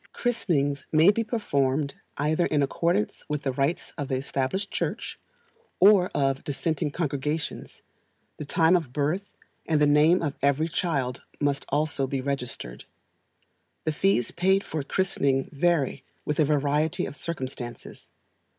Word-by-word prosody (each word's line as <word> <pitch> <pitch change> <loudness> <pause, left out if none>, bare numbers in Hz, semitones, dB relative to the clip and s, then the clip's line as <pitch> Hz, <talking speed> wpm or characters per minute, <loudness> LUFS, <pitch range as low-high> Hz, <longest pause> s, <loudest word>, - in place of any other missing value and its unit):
Christenings 145 - 0
may 160 +5 +6
be 230 +2 -1
performed 140 - 0 0.2
either 155 +4 +1
in 145 -2 +2
accordance 170 +8 0
with 150 -1 -2
the 135 - 0
rites 140 +6 -1
of 145 - -2
the 130 - -1
Established 140 +9 -2
Church, - - -3 0.6
or 190 -1 +6
of 135 -1 +1
dissenting 150 +1 -1
congregations; 150 0 -3 0.5
the - - -5
time 160 +4 +4
of 160 -8 -1
birth, 155 +8 -1 0.4
and 155 -2 +2
the 150 - +5
name 150 +5 +4
of 145 -3 -3
every 140 +4 +2
child, 140 -8 -1 0.2
must 145 -1 0
also 145 -2 0
be 135 0 -2
registered. 125 - -4 1.0
The 155 - 0
fees 155 -6 +1
paid 190 +3 +2
for 155 - -3
christening 140 -4 0
vary 145 -3 +1 0.2
with 150 +1 -1
a 155 - +5
variety 150 +1 +1
of - - -7
circumstances. 130 -5 -6
150 Hz, 140 wpm, -26 LUFS, 140-170 Hz, 1.0 s, may